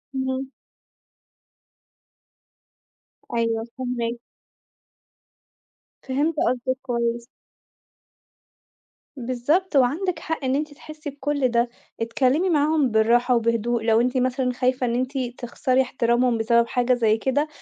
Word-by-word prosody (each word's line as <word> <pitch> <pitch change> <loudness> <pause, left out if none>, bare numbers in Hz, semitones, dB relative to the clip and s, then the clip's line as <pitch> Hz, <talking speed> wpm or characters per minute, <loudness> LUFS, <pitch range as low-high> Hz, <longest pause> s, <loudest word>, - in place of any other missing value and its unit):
اهم. 260 0 -2 2.8
أيوه 230 -1 0
فاهماكِ. 240 -2 -3 1.8
فهِمت 290 +5 0
قصدِك 255 +1 -1
كويس. 235 -2 -2 1.9
بالضبط، 270 +9 -1
وعندِك 315 +7 +2
حق 320 -2 -4
إن 260 - +1
أنتِ 300 +1 -2
تحسّي 305 +1 -9
بكُل 285 -1 -1
ده، 235 0 +1 0.3
اتكلّمي 265 +9 +1
معاهم 300 -4 +2
بالراحة 235 +3 +3
وبهدوء 230 0 0
لو 225 0 +4
أنتِ 250 +1 0
مثلًا 255 0 0
خايفة 255 0 0
إن 235 -1 0
أنتِ 260 +2 -2 0.2
تخسري 255 +2 +1
إحترامهم 240 -1 +1
بسبب 235 +1 +3
حاجة 250 0 +1
زي 225 -3 +2
كده، 270 +6 0
255 Hz, 100 wpm, -23 LUFS, 235-275 Hz, 2.8 s, لو